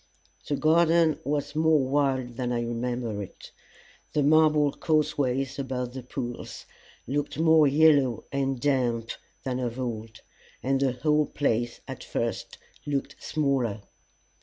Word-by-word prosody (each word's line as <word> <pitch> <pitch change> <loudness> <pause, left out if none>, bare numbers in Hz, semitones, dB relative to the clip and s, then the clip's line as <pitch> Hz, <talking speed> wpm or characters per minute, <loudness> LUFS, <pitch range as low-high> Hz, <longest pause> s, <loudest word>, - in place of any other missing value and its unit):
The 145 - 0
garden 165 +1 +3
was 145 +2 -2
more 160 0 +4
wild 130 -3 0
than 125 -1 -2
I 120 -1 0
remembered 120 -2 -3
it; 95 - -10 0.6
the 150 - +2
marble 150 -1 +4
causeways 140 -5 0
about 125 -2 -3
the 130 - -6
pools 120 -1 -6 0.4
looked 145 +3 -2
more 160 -1 +5
yellow 140 -4 +4
and 135 -2 -1
damp 120 -4 0 0.3
than 130 -1 -2
of 125 0 -3
old, 115 -3 -5 0.4
and 135 +1 +1
the 135 -2 +2
whole 150 +4 +1
place 120 -4 -1
at - - -7
first - - -3 0.3
looked 145 0 -2
smaller. 130 -9 -1
135 Hz, 130 wpm, -27 LUFS, 125-150 Hz, 0.6 s, more